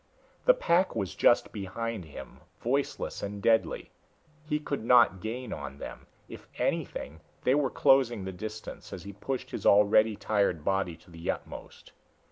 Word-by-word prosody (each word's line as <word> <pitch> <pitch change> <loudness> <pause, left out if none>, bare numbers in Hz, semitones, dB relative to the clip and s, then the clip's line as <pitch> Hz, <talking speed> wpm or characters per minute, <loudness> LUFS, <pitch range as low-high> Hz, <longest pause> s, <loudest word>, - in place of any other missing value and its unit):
The - - +7
pack 185 - +2
was 100 -5 -2
just 120 - +3
behind 105 0 -4
him, 75 - -10 0.2
voiceless 135 +4 -1
and 100 0 -4
deadly. 110 +2 +1 0.6
He 150 - +2
could 140 -5 -4
not 115 -7 +5
gain 115 +2 -4
on 70 -2 -7
them - - -9 0.2
if - - -11
anything, 80 +2 -2 0.2
they 130 - +4
were 140 -2 +2
closing 130 -7 +3
the 95 - -4
distance 110 +4 -8
as 90 - -7
he 100 +1 -8
pushed 130 +6 -4
his - - -5
already 105 +2 +5
tired 100 -7 0
body 95 -4 0
to 85 +1 -20
the 85 0 -6
utmost. - - -6
110 Hz, 155 wpm, -29 LUFS, 95-125 Hz, 0.6 s, The